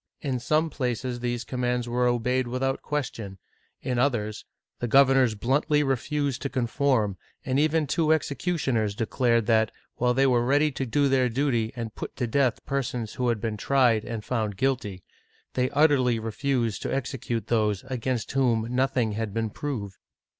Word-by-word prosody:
In 130 -4 -2
some 155 +5 +1
places 125 -2 -2
these 120 0 -2
commands 125 0 -1
were 125 +1 +1
obeyed 125 +1 +1
without 130 +2 -1
question; 115 -9 -4 0.5
in 125 -2 -1
others, 110 -5 0 0.3
the 120 - -2
governors 135 -2 +5
bluntly 145 +7 +1
refused 140 +1 -1
to 140 - -2
conform, 120 -5 0 0.3
and 130 0 +1
even 155 +1 +2
two 155 +2 +1
executioners 140 - 0
declared 115 +1 +1
that, 110 -1 +3 0.3
while 125 0 +2
they 135 +1 +4
were 125 -3 +3
ready 145 +4 +3
to 135 -1 -3
do 140 +5 +2
their 130 -2 +2
duty 120 -3 0
and 115 -3 -5
put - - -7
to 125 - -1
death 130 +1 +1
persons 125 -5 -2
who 125 - -1
had 115 -2 +1
been 110 0 -3
tried 120 -2 +3
and 110 -3 -5
found 110 -5 -2
guilty, 105 -8 -1 0.5
they 125 0 +1
utterly 140 -6 +3
refused 115 0 -1
to - - -3
execute 125 -3 -3
those 105 -4 +1
against 125 -2 -3
whom 120 -5 +2
nothing 125 -3 +1
had 105 -1 -4
been 115 -1 -1
proved 110 -8 -5
125 Hz, 160 wpm, -26 LUFS, 115-135 Hz, 0.5 s, governors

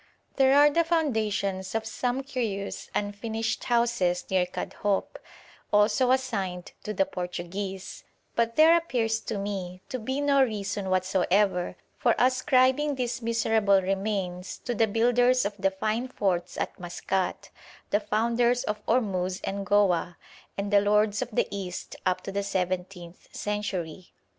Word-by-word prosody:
There 270 0 +5
are 295 +1 +7
the 335 +3 +3
foundations 215 - -1
of 225 0 -1
some 250 +4 -2
curious 225 -8 -4
unfinished 220 +2 -2
houses 235 -7 +1
near 185 -1 +2
Kadhoup, 200 +2 -2 0.5
also 210 +4 +3
assigned 200 -9 -1
to 215 - -4
the 195 -2 +2
Portuguese; 185 +2 -5 0.3
but 230 0 +1
there 320 +2 +7
appears 235 -9 0
to 220 - -4
me 190 -2 -5
to 255 - -3
be 265 +5 -2
no 285 -1 +3
reason 205 -4 -2
whatsoever 185 0 +1 0.2
for - - +3
ascribing 260 +3 +3
these 245 -2 -2
miserable 220 -3 +3
remains 190 -1 -2
to 245 - -1
the 225 -1 +2
builders 245 +3 +3
of 205 - -1
the 195 0 +3
fine 215 +6 -2
forts 180 -7 -1
at - - -3
Maskat, 180 +1 -3 0.4
the 205 - +3
founders 235 +3 +1
of 210 0 -3
Ormuz 190 -6 0
and 195 0 -3
Goa, 180 -4 +2 0.4
and 200 +1 -3
the 200 - +6
lords 210 +1 +2
of 255 - -3
the 220 - 0
East 190 -3 -5
up 185 0 +1
to 195 - -6
the 200 +1 -1
seventeenth 180 -2 -4
century. 190 -4 -4
205 Hz, 140 wpm, -27 LUFS, 190-240 Hz, 0.5 s, are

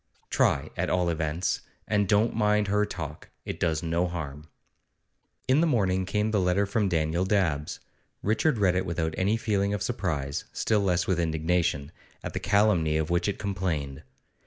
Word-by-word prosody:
'Try, - - +2
at - - -1
all 90 -1 +1
events. 80 +2 -1 0.3
And 105 -3 +1
don't 105 +3 +3
mind 105 -2 +2
her 105 +1 +2
talk; 75 -2 -7 0.2
it - - -5
does 80 -1 0
no 85 +2 +1
harm.' 75 -3 -6 1.0
In 135 +4 +4
the 170 - +3
morning 95 - +1
came 105 +3 0
the 105 - +2
letter 90 +2 +2
from 100 0 0
Daniel 80 +1 +1
Dabbs. 90 -7 0 0.4
Richard 115 +6 +2
read 95 -4 +3
it 95 +1 -1
without 80 -1 -1
any 100 +4 +1
feeling 100 -2 0
of 100 - -3
surprise, 70 -7 -2
still 110 -2 +1
less 90 -3 +1
with 90 -3 0
indignation, 80 -2 0 0.3
at - - -5
the - - -2
calumny 100 -7 +2
of 80 +1 -1
which 85 +1 +1
it 100 - -1
complained. 85 -8 -3
90 Hz, 170 wpm, -27 LUFS, 80-105 Hz, 1.0 s, In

